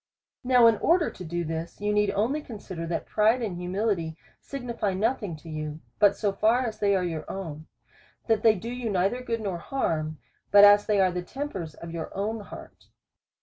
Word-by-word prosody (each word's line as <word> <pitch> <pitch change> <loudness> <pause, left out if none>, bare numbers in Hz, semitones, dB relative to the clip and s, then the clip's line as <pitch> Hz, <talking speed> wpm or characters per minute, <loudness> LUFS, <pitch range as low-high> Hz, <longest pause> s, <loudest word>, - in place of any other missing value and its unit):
Now 250 -1 +5
in 225 -2 +6
order 340 - +2
to 185 - -10
do 175 +1 -3
this, 160 +1 -5
you 205 +1 0
need 210 -1 +2
only 250 +9 0
consider, 190 - -7
that 170 - -2
pride 220 +3 +2
and 200 -5 -3
humility 180 -2 -2 0.2
signify 235 -7 -3
nothing 210 -3 -1
to 155 +2 -14
you, 155 -1 -5 0.2
but 205 -1 +5
so 205 -2 0
far 225 +5 +2
as 220 -2 -5
they 200 -1 +3
are 185 - +1
your 160 -3 -4
own; 160 -5 -6 0.6
that 225 -2 +2
they 220 -1 +5
do 230 +5 -6
you 245 -2 -3
neither 195 +5 +1
good 230 -2 -3
nor 190 -5 -3
harm, 155 - -2 0.3
but 205 0 +8
as 205 0 +7
they 210 -2 +2
are 185 -1 +4
the 180 0 -3
tempers 190 - -6
of 170 0 -9
your 165 -2 -5
own 215 +3 -2
heart. 205 - -12
200 Hz, 195 wpm, -27 LUFS, 170-225 Hz, 0.6 s, but